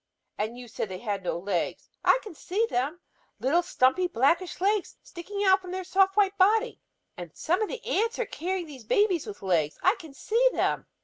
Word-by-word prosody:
And 220 +3 -3
you 250 -1 -9
said 220 -2 -4
they 185 - -5
have 200 -1 -3
no 180 - -2
legs. 180 -1 -2 0.2
I - - +5
can 420 - -9
see 390 +8 -1
them; 285 +8 -1 0.4
little 305 +7 +3
stumpy 340 +2 +2
blackish 335 +5 +1
legs 400 +1 0
sticking 400 +4 -5
out 380 -1 +5
from 365 - -10
their 375 +1 -4
soft 385 +2 +2
white 400 -1 +3
body! 440 +5 +3 0.4
And 175 -3 -9
some 355 +7 0
of 430 - 0
the - - -7
ants 455 +4 0
are 485 - -1
carrying 365 0 -3
these 275 -6 -11
babies 360 - +2
with 205 -1 -8
legs; 165 -5 +1
I 370 - +5
can 315 -6 -12
see 475 - +2
them!" - - 0
355 Hz, 200 wpm, -27 LUFS, 245-395 Hz, 0.4 s, I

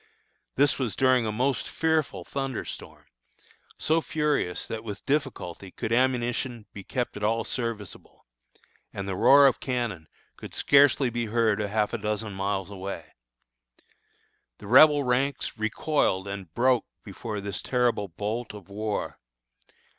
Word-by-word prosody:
This 140 +1 +3
was 125 -6 -1
during 130 -3 +3
a - - -1
most 125 +3 0
fearful 160 -2 0
thunder 135 -3 -3
storm, - - -9 0.7
so 160 +1 +2
furious 150 - -1
that 110 -1 -5
with 105 -3 -7
difficulty 135 - -2
could 110 +4 -3
ammunition 120 -2 0
be 100 - -8
kept 125 +4 -3
at 105 - -6
all 115 +2 +1
serviceable, 115 -6 -6 0.7
and 100 -1 -5
the 95 - -2
roar 140 +8 +7
of 135 - +4
cannon 120 - -3 0.3
could - - -9
scarcely 140 -2 +4
be 120 0 -2
heard 110 -1 +2
a 105 - -1
half 105 0 0
dozen 105 -1 -3
miles 95 0 -2
away. 95 -5 -7 1.4
The - - -12
Rebel 145 +6 +7
ranks 130 +2 0
recoiled 110 -2 0
and 100 -4 -6
broke 125 0 +3 0.2
before 105 +1 -6
this 100 -1 -4
terrible 120 -5 +1
bolt 105 +6 -4
of 100 -2 -12
war. 105 +1 -3
115 Hz, 140 wpm, -27 LUFS, 100-130 Hz, 1.4 s, roar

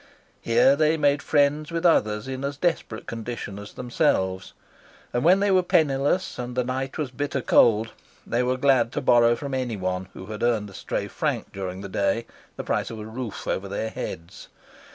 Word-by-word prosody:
Here 125 +4 +4
they 155 +2 +2
made 145 -1 +2
friends 150 +1 +1
with 165 +1 -2
others 105 -9 +3
in 130 0 -5
as 140 0 -3
desperate 160 -10 -1
condition 115 -3 -6
as 105 0 -10
themselves, 95 -6 0 0.6
and 120 - 0
when 185 +4 +5
they 200 0 +3
were 185 -1 +5
penniless 150 0 +1
and 125 0 -5
the 125 - +1
night 130 +2 -3
was 145 -5 -3
bitter 140 +2 -2
cold, 115 -2 +4 0.3
they 120 - 0
were 125 +1 0
glad 130 -3 +3
to - - -1
borrow 120 -2 +5
from 140 +2 -6
anyone 95 -8 -2
who 95 - -9
had 110 +2 -7
earned 110 -4 +1
a - - -15
stray - - -3
franc - - -3
during 95 -1 -5
the 100 - -6
day 100 +4 0 0.3
the - - -5
price - - -1
of 115 - -7
a 105 - -7
roof 110 0 -6
over 100 - -2
their 105 +3 -3
heads. 85 -5 -7
120 Hz, 190 wpm, -25 LUFS, 105-140 Hz, 0.6 s, when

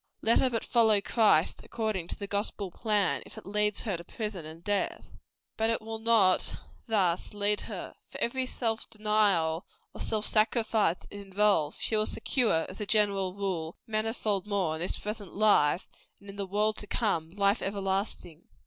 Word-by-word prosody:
Let 225 +1 +4
her 260 - +3
but 230 -2 -2
follow 220 -4 +4
Christ 205 -6 +3
according 215 -7 -3
to - - -3
the 200 - -6
gospel 200 -1 -3
plan, 210 -1 +1
if - - -13
it - - -10
lead 210 +1 +1
her 200 -6 -2
to 170 - -9
prison 200 -4 -5
and 165 +2 -12
to 205 - -1
death. 200 - -2 0.5
But 225 0 +1
it 230 - +1
will 225 0 -6
not 220 -5 +3 0.3
thus 195 -4 +1
lead 205 0 +1
her. - - -6 0.2
For - - -8
every 260 +2 0
self 225 -3 -2
denial 205 -7 +1 0.3
or - - -8
self 215 -1 0
sacrifice 220 -4 +2
it - - -9
involves, 195 -6 +2
she 220 - +1
will 215 0 +2
secure, 220 -11 +1
as 190 - -8
a 210 - -3
general 200 -3 +2
rule, 180 -5 -3
manifold 215 -3 -1
more 195 -6 0
in 160 - -5
this 180 - -1
present 210 -2 -6
life, 195 -5 +3 0.3
and 200 0 -10
in - - -13
the 200 -1 -4
world 210 +2 +1
to 205 - -6
come, 180 -10 0
life 200 +3 +1
everlasting. 195 -4 -3
205 Hz, 180 wpm, -29 LUFS, 190-220 Hz, 0.5 s, Let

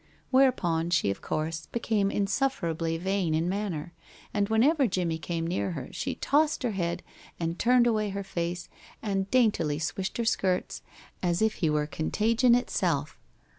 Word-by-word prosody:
Whereupon 180 -12 +3
she 170 - +2
of 100 - -6
course 160 +1 -3
became 220 -4 0
insufferably 175 - 0
vain 185 -2 0
in 165 +2 0
manner, 180 -4 -3 0.4
and 205 0 +1
whenever 265 +6 +4
Jimmie 175 -4 -1
came 165 0 -3
near 180 +2 -1
her 145 - -6
she - - -3
tossed 300 +1 +1
her 245 - +1
head 175 -4 -2 0.4
and 165 +1 -2
turned 245 0 +4
away 215 -3 +1
her 200 0 -4
face, 175 -2 -3 0.4
and 195 -2 -1
daintily 210 -12 +2
swished 185 +5 -3
her 235 - -1
skirts 185 -4 0 0.4
as 175 -1 +1
if 220 0 +2
he 160 - +3
were 150 0 +1
contagion 225 - +2
itself. 245 - -1
190 Hz, 155 wpm, -28 LUFS, 165-225 Hz, 0.4 s, whenever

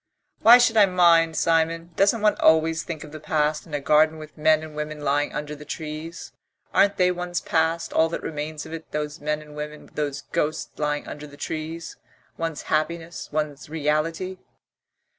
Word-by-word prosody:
"Why 235 +2 +10
should 230 -2 +3
I 205 -2 +7
mind, 170 -3 +4
Simon? 165 +1 +1
Doesn't 205 +3 +3
one 210 - +5
always 160 0 +4
think 160 -3 -6
of 150 - -11
the 155 - -8
past, 150 0 0
in 150 - -5
a - - 0
garden 155 +3 +3
with 155 -1 -11
men 155 0 +3
and 155 -1 -9
women 150 0 -5
lying 145 +1 +1
under 150 0 -5
the 150 - -11
trees? 155 +2 -7 0.4
Aren't 200 0 +4
they 180 -1 +4
one's 180 -1 -3
past, 165 +1 0
all 160 0 +3
that 170 - -5
remains 150 0 -5
of - - -9
it, 165 0 -8
those 150 0 -3
men 150 +1 -2
and 150 -1 -14
women, 150 0 -7
those 145 -2 -3
ghosts 155 +1 -1
lying 150 -1 -1
under 150 0 -7
the 145 0 -14
trees,... 160 +2 -5 0.4
one's 165 -3 -4
happiness, 165 +2 -2
one's 150 -1 -3
reality?" 160 +4 -1
155 Hz, 180 wpm, -24 LUFS, 150-165 Hz, 0.4 s, Why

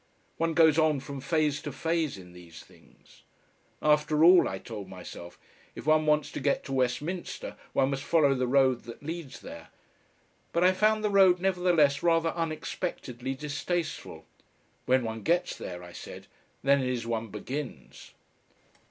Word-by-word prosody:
One 165 -1 0
goes 160 -2 +5
on 155 -3 +3
from 135 0 -7
phase 150 0 0
to 145 - -5
phase 160 0 -1
in 90 -2 -13
these 85 -2 -13
things. - - -22 0.6
"After 150 0 +3
all," 180 +1 +7
I 95 - -4
told 105 -1 -8
myself, 90 -2 -10 0.4
"if - - -9
one 155 0 +3
wants 150 0 +2
to - - -5
get 140 0 0
to 135 - -6
Westminster 135 +8 -2 0.2
one 135 +1 +2
must 135 0 -2
follow 150 -3 +3
the 130 -1 -1
road 130 -2 +3
that 120 +3 -10
leads 160 -2 -6
there," - - -10 0.9
but 170 - +2
I 185 - +6
found 215 +3 +2
the 210 - +1
road 190 -2 +5
nevertheless 175 -6 +2
rather 165 -1 +3
unexpectedly 155 -6 -4
distasteful. 150 +4 -4 0.6
"When 130 0 +3
one 110 -1 -4
gets 175 - +1
there," 90 0 -7
I 85 - -11
said, - - -10 0.4
"then 140 +1 +4
it 130 - -1
is 125 -2 -2
one 115 -1 -2
begins." 105 - -7
145 Hz, 160 wpm, -28 LUFS, 125-165 Hz, 0.9 s, all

